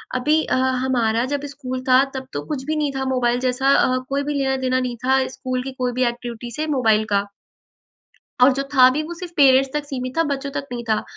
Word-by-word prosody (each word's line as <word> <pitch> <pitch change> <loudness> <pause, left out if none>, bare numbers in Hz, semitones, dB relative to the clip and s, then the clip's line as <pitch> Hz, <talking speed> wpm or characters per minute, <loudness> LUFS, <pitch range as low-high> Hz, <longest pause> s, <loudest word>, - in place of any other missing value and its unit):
अभी 295 +5 +2
ह - - +3 0.3
हमारा 235 -3 +1
जब 285 - -1
स्कूल 260 -2 -6
था 255 +1 +6
तब 265 0 -5
तो - - -3
कुछ 290 -4 -4
भी 310 +2 -1
नहीं 300 -2 0
था 265 - -1
मोबाइल 245 -2 +1
जैसा 255 +1 0
अ, 255 - +3
कोई 280 +1 -1
भी 295 +1 -2
लेना 270 -2 0
देना 255 0 0
नहीं 250 -1 -3
था 265 0 +2
स्कूल 255 -1 -4
की 270 - -5
कोई 250 -1 0
भी 255 +1 0
एक्टिविटी 240 0 -6
से 305 +6 -3
मोबाइल 225 -7 +2
का। 200 0 +2 1.2
और 260 +1 +6
जो 275 +1 -2
था 255 -1 +8
भी 300 +4 -2
वो 330 +3 -6
सिर्फ 355 0 -8
पेरेंट्स 270 -1 +5
तक 295 0 -1
सीमित 255 -1 -5
था 330 - +4
बच्चों 280 0 -3
तक 280 0 -5
नहीं 240 -1 -4
था। 215 - +1
260 Hz, 230 wpm, -21 LUFS, 250-280 Hz, 1.2 s, था